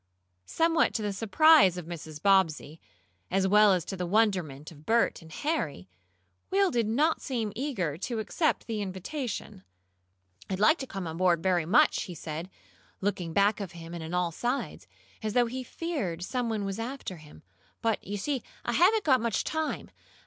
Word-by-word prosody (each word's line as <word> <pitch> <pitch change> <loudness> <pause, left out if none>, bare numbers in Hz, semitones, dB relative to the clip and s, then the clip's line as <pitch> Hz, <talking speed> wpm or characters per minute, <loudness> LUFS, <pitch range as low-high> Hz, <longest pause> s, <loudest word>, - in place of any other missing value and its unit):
Somewhat 330 0 +2
to 220 - -1
the 205 -1 -1
surprise 225 - +5
of 175 - -6
Mrs. 160 -3 -8
Bobbsey, 165 -4 +2 0.5
as 190 +1 +2
well 210 +1 +6
as 180 -4 +1
to 195 - -5
the 180 -1 -3
wonderment 180 -9 0
of 150 -2 -15
Bert 230 +2 +2
and 160 -1 -14
Harry, 155 - -2 0.6
Will 390 -1 +3
did 235 -3 +1
not 295 +9 +2
seem 225 -6 -3
eager 205 - -2
to 235 +4 -3
accept 260 +9 0
the 220 -3 -3
invitation. 200 - -5 0.9
"I'd 190 -1 -2
like 310 - +5
to 265 - -5
come 195 -5 -5
on 160 0 -5
board, 175 -2 +2
very 180 -4 +1
much," 270 - +4
he 180 - -8
said, 160 +3 -6 0.5
looking 185 -4 -2
back 200 +4 +3
of 195 -3 -6
him, 165 0 -9
and 170 -2 -5
on 165 +2 -4
all 180 -1 +1
sides, 245 - -3 0.3
as 215 -1 -2
though 245 0 +4
he 255 +3 -4
feared 235 - -4
some 245 +3 -2
one 215 -3 -2
was 195 +2 -4
after 235 -6 -5
him. 150 - -15 0.4
"But 225 -1 0
you 205 +1 -4
see 265 +5 -2 0.2
I - - 0
haven't 390 - +4
got 260 -5 +4
much 230 -4 0
time. 315 0 -3
205 Hz, 180 wpm, -28 LUFS, 175-250 Hz, 0.9 s, well